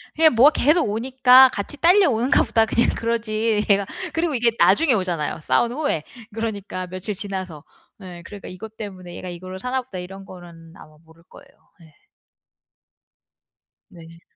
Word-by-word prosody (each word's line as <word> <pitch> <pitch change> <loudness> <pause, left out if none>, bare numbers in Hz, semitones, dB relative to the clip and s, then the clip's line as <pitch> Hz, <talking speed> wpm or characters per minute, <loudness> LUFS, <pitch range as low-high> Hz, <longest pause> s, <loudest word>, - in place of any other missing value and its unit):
그냥 315 -4 +4
뭐가 265 +6 +6
계속 300 0 +2
오니까 255 +3 +5
'같이 205 +8 -5
딸려오는가 330 - +3
보다.' 225 0 +2
그냥 235 +2 +1
그러지. 225 -2 -1
얘가. 200 0 +3 0.3
그리고 325 -3 -1
이게 235 -1 +2
나중에 305 -5 +4
오잖아요, 175 -8 -2
싸운 235 +9 +1
후에. 275 - -2 0.3
그러니까 205 -5 -5
며칠 185 +3 -6
지나서. 185 -6 -6 0.4
예. 180 -2 -10
그러니까 205 -2 -10
'이것 220 +4 -11
때문에 185 -4 -9
얘가 185 - -7
이거를 185 +2 -9
사나 255 +3 -2
보다.' 200 -7 -9
이런 195 +2 -10
거는 170 -3 -14
아마 155 0 -16
모를 160 +1 -22
거예요. - - -16 0.3
예. 160 -2 -19 2.0
네. 165 -1 -15
210 Hz, 345 characters per minute, -21 LUFS, 180-250 Hz, 2.0 s, 뭐가